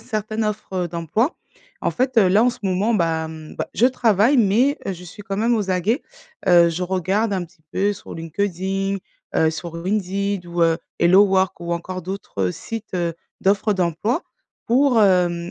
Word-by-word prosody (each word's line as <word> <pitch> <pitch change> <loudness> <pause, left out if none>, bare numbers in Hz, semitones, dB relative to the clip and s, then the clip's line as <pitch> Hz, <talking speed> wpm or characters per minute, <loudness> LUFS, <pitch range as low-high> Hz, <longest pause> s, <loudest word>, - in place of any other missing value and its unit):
certaines 215 -1 -3
offres 195 -4 -2
d'emploi. 170 - -1 0.5
En - - 0
fait, 255 -1 +1
heu, 195 -4 +5
là 205 +5 +4
en 250 - +4
ce - - -11
moment, 195 +4 +1
bah, 165 -6 +1
hem, 160 -1 -9
bah, - - -3
je 240 - +4
travaille, 240 0 +3
mais 240 +5 +3
je 180 -2 -5
suis 180 +4 -11
quand 200 -1 -4
même 235 +2 +2
aux 205 -3 -1
aguets. 190 - +1 0.4
Heu, 175 -2 +6
je 170 +2 -3
regarde 190 +4 0
un 185 -2 -1
petit 170 -1 -28
peu 205 +2 +1
sur - - -11
LinkedIn, 195 +3 -2 0.4
heu, 160 0 +3
sur 165 +1 -6
ou - - -7
Indeed, 200 -1 -1
ou 175 0 -3
heu, 165 -1 +4 0.2
HelloWork, 190 +1 +4
ou 170 0 -3
encore 185 +1 -4
d'autres 170 - -3
sites, 225 - -7
heu, 170 -2 -1 0.3
d'offres 200 +2 +2
d'emploi, 190 - 0 0.4
pour, 250 -1 +4
hem, 175 -2 +2
195 Hz, 180 wpm, -21 LUFS, 175-215 Hz, 0.5 s, Heu